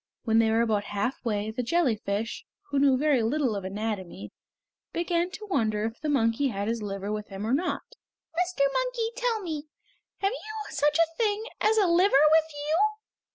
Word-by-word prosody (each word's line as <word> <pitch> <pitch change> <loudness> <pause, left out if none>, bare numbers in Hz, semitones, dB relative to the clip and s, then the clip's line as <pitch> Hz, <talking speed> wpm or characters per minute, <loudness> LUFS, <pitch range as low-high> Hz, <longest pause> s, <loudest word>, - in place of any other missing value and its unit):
When 225 -1 +3
they 225 -1 +4
were 225 +1 +3
about 210 -3 0
halfway, 210 0 -2
the 235 - -2
jellyfish, 230 -7 0 0.3
who 280 - +2
knew 275 -2 +4
very 285 -3 +3
little 240 0 +1
of 200 - -4
anatomy, 195 -1 -4 0.6
began 345 0 0
to 425 +3 -8
wonder 215 - 0
if 225 +4 -5
the 305 - -2
monkey 245 -1 +2
had 200 -4 -3
his 230 0 -1
liver 200 0 -4
with 210 0 -4
him 195 +1 -6
or 230 - 0
not! 340 +6 0 0.5
"Mr. 360 -2 0
Monkey, - - -1
tell 480 -3 0
me, 310 -3 -4 0.5
have 390 0 +2
you 435 -2 -6
such 295 +1 +2
a 330 0 +2
thing 430 -1 +1 0.2
as 440 +1 +3
a 415 - +5
liver 340 -4 +5
with 320 0 +4
you?" 295 +2 -1
275 Hz, 180 wpm, -27 LUFS, 220-345 Hz, 0.6 s, a